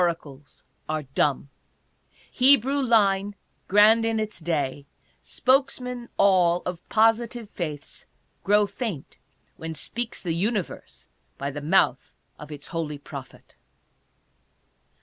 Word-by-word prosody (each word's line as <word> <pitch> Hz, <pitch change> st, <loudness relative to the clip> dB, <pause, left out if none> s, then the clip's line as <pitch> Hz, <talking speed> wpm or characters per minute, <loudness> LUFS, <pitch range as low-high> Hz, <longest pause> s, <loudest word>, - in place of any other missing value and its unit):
Oracles 150 Hz, -5 st, -3 dB, 0.3 s
are 155 Hz, -1 st, -1 dB
dumb. 140 Hz, 0 st, -1 dB, 0.8 s
Hebrew 275 Hz, +1 st, +4 dB
line, 205 Hz, -5 st, +2 dB, 0.3 s
grand 215 Hz, +3 st, +6 dB
in 225 Hz, -1 st, 0 dB
its 215 Hz, -3 st, -4 dB
day, 145 Hz, -4 st, -2 dB, 0.3 s
spokesmen 250 Hz, -, 0 dB
all 180 Hz, -3 st, +4 dB
of 180 Hz, -2 st, -4 dB
positive 225 Hz, +1 st, +2 dB
faiths, 155 Hz, -5 st, -6 dB, 0.4 s
grow 205 Hz, +1 st, +4 dB
faint 200 Hz, -, -6 dB, 0.4 s
when 160 Hz, 0 st, -6 dB
speaks 235 Hz, +10 st, -3 dB
the 170 Hz, -3 st, -1 dB
Universe 200 Hz, +2 st, -3 dB, 0.3 s
by 140 Hz, +1 st, -3 dB
the 145 Hz, +1 st, -6 dB
mouth 145 Hz, -5 st, +1 dB, 0.2 s
of 150 Hz, 0 st, -10 dB
its 145 Hz, -1 st, -9 dB
holy 160 Hz, -4 st, -3 dB
prophet. 145 Hz, -, -11 dB
190 Hz, 110 wpm, -25 LUFS, 150-225 Hz, 0.8 s, grand